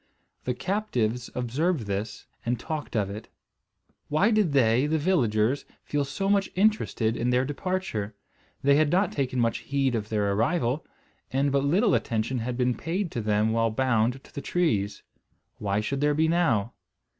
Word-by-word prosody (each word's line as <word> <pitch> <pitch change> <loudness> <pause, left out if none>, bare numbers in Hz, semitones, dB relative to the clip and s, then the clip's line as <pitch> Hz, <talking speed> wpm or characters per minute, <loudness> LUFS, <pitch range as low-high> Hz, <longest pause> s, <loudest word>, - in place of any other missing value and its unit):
The 125 - -1
captives 125 - -1
observed 135 +6 0
this, 100 0 -4 0.2
and 120 0 -1
talked 155 -5 -5
of 100 -3 0
it. 105 +2 -7 0.8
Why 185 +9 +3
did 210 -7 +3
they, 125 0 +3
the 160 +1 +1
villagers, 130 - +1 0.2
feel 145 -1 -1
so 195 +8 -3
much 200 -1 +2
interested 185 - +2
in 120 +1 -1
their 125 +1 +2
departure? 145 - -3 0.5
They 140 +1 +5
had 155 -1 +3
not 185 +6 +2
taken 130 -3 -1
much 115 -1 +1
heed 135 -2 0
of 110 -2 -2
their 105 -2 +1
arrival; 120 - 0 0.5
and 135 +2 +1
but 140 0 +2
little 190 +7 +3
attention 115 +2 0
had 120 +1 -3
been 125 -1 +2
paid 175 +7 -3
to 120 - -3
them 105 +1 +1
while 115 0 +2
bound 125 +1 +1
to - - -19
the 140 - -5
trees. 105 - 0 0.6
Why 100 0 0
should 135 +5 -2
there 150 0 +3
be 160 +1 +3
now? 130 -11 +1
130 Hz, 165 wpm, -27 LUFS, 110-160 Hz, 0.8 s, They